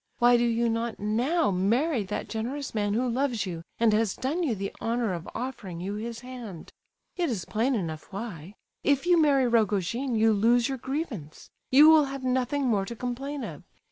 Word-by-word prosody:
Why 245 0 +5
do 240 - +3
you 235 0 +1
not 230 0 -1
now 240 +8 +1
marry 230 - +1
that 200 - -4
generous 255 +6 -4
man 205 -1 0
who 250 +3 +1
loves 245 -3 0
you, 170 -3 -5 0.2
and 225 -2 +4
has 215 -2 +1
done 290 +8 -2
you 275 -10 0
the 195 0 -4
honour 230 -3 0
of 170 -2 -6
offering 225 -9 -5
you 190 +3 -4
his 230 +2 -5
hand? 245 -9 -9 0.5
It 345 -3 +1
is 205 -8 -3
plain 240 +5 0
enough 165 -6 -4
why; 195 -3 -7 0.3
if 285 0 +2
you 350 -2 +5
marry 275 -4 +4
Rogojin 230 +2 +1
you 220 0 +4
lose 230 +3 +3
your 265 -2 -4
grievance; 250 - -5 0.2
you 290 +4 +8
will 315 -2 +7
have 275 -1 -6
nothing 260 +2 0
more 210 -6 +1
to 235 - -6
complain 265 +4 -4
of. - - -7
235 Hz, 190 wpm, -27 LUFS, 210-265 Hz, 0.5 s, you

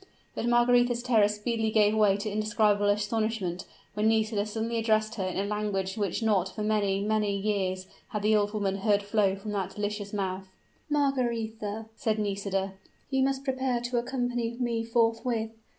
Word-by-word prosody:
But 235 - -2
Margaretha's 240 0 +3
terror 225 -5 +4
speedily 220 +2 -1
gave 215 -1 +4
way 205 -2 +4
to 205 +2 -4
indescribable 210 -1 +2
astonishment 210 -3 -1 0.3
when 210 +1 +1
Nisida 220 -1 +1
suddenly 225 +2 -2
addressed 220 0 +1
her 205 -5 -3
in 185 -1 -3
a 195 - 0
language 200 -2 -2
which 205 +1 -1
not 195 -4 +2
for 215 - -3
many, 205 -2 +1
many 210 -1 +1
years, 190 -2 -1 0.2
had 210 -3 -4
the 215 +1 +4
old 205 -1 +2
woman 200 -2 -1
heard 205 0 +2
flow 205 -2 +2
from 200 +2 -6
that 195 -2 -3
delicious 205 -1 -3
mouth! 190 -2 -3 0.4
"Margaretha," 230 -7 -1
said 220 -1 0
Nisida, 195 -2 -2 0.4
"you 265 0 +2
must 270 0 +1
prepare 260 -2 0
to 240 +1 -2
accompany 245 -1 -2
me 235 -2 0
forthwith! 230 0 0
215 Hz, 165 wpm, -28 LUFS, 205-230 Hz, 0.4 s, terror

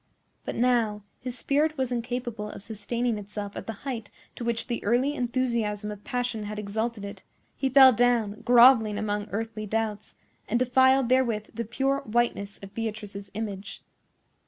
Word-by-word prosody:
But - - -4
now 230 -4 +1 0.2
his 250 -1 -5
spirit 300 +4 +1
was 260 -2 -1
incapable 240 -3 -3
of 195 - -9
sustaining 225 +2 -2
itself 205 0 -6
at - - -7
the 225 - -3
height 230 -6 -4 0.3
to - - -6
which 235 -1 -1
the 235 - -3
early 250 +7 +2
enthusiasm 235 -5 -1
of 205 -1 -9
passion 245 -3 -2
had 210 0 -5
exalted 210 +1 -3
it; 200 - -8 0.3
he 270 - 0
fell 265 -1 +8
down, 225 -2 +2
grovelling 235 -3 +6
among 210 0 -2
earthly 215 0 -4
doubts, 215 -1 -2 0.3
and 235 - +2
defiled 260 +1 +4
therewith 235 -5 +1
the 230 +1 -3
pure 270 +5 0
whiteness 215 -3 -1
of 195 0 -10
Beatrice's 210 -3 -5
image. 205 -2 -5
230 Hz, 155 wpm, -27 LUFS, 210-245 Hz, 0.3 s, fell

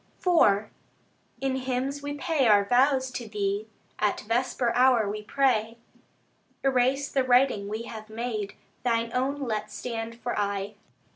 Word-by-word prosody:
IV 220 - +4 0.8
In 265 -1 0
hymns 265 +2 -2
we 285 0 -4
pay 290 -3 +1
our 205 -2 +5
vows 260 +3 +3
to 240 -2 -5
Thee: 205 0 -2 0.3
At 210 -1 +1
vesper 235 +2 0
hour 250 -4 +4
we 210 +1 -3
pray, 230 -2 +1 0.9
Erase 270 +1 +2
the 270 - +2
writing 250 -5 +3
we 215 +2 -4
have 220 -2 -9
made, 220 -2 -4 0.3
Thine 230 -1 0
own 275 +3 -1
let 215 -4 -3
stand 230 +1 -5
for 240 - -3
aye. 200 0 -2
240 Hz, 140 wpm, -27 LUFS, 215-265 Hz, 0.9 s, our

